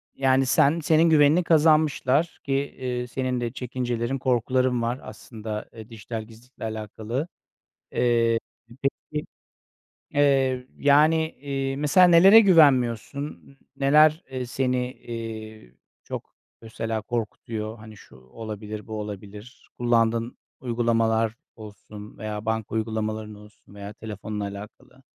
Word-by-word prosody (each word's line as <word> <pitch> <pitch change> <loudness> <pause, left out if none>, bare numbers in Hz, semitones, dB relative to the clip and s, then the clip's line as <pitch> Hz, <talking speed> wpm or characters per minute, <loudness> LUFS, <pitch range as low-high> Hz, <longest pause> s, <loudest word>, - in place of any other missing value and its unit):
yani, 135 0 +3
sen 145 +5 +3
senin 160 +2 +3
güvenini 155 +3 +5
kazanmışlar 155 -1 +3
ki, 135 - -2
eee, 130 -3 -3
senin 125 -1 -2
de 120 -1 -2
çekincelerin, 125 0 -3
korkuların 125 0 +1
var 120 +3 -2
aslında, 110 0 -7
eee, 110 0 -11
dijital 110 0 -6
gizlilikle 115 +3 -15
alakalı. 110 - -4 0.6
Eee, 115 -1 +2 0.4
peki, 150 +2 -3 0.9
eee, 135 -3 +2
yani, 155 +3 +4
iii, 135 -1 -3
mesela 165 +5 +5
nelere 190 +6 +8
güvenmiyorsun? 140 - +3 0.3
N 135 - -2
neler, 155 +2 +5
eee, 130 -1 -3
seni, 125 0 -1
eee, 110 - -8 0.3
çok - - -8 0.3
mesela 115 -1 -4
korkutuyor? 110 -1 -4
Hani, 110 -1 -12
şu - - -17
olabilir, 105 - -8
bu 110 -1 -5
olabilir, 105 +2 -9
kullandığın 115 0 +1 0.2
uygulamalar 115 -2 +1 0.2
olsun 105 -1 -11
veya 105 -1 -5
banka 110 -1 -2
uygulamaların 110 -1 -3
olsun 105 -1 -17
veya 100 +1 -8
telefonla 105 -1 -6
alakalı. 105 +6 -10
120 Hz, 115 wpm, -25 LUFS, 110-135 Hz, 0.9 s, nelere